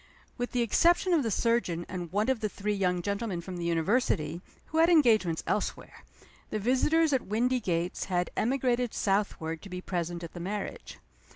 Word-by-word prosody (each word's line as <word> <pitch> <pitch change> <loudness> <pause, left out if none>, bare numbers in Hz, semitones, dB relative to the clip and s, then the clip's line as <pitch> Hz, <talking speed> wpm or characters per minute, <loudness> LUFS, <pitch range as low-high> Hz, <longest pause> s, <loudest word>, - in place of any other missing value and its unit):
With 245 -1 -3
the 245 -1 +1
exception 345 - +3
of 325 - +4
the 230 - -1
surgeon 195 -6 0
and 175 -3 -6
one 205 +3 +1
of 260 -3 +1
the 215 -1 -1
three 210 +1 -2
young 180 -3 0
gentlemen 200 -2 -2
from 180 +1 -7
the 170 - -4
University, 170 -1 0 0.3
who 320 - 0
had 330 +1 +6
engagements 220 - +4
elsewhere, 210 - -3 0.5
the - - -2
visitors 280 +8 +2
at 260 - 0
Windygates 210 -6 0
had 180 -2 -1
emigrated 245 0 0
southward 195 -5 -1
to 200 - -11
be 180 0 -5
present 175 -1 -3
at 170 - -8
the 175 - -7
marriage. 200 +3 -5
205 Hz, 175 wpm, -29 LUFS, 175-245 Hz, 0.5 s, had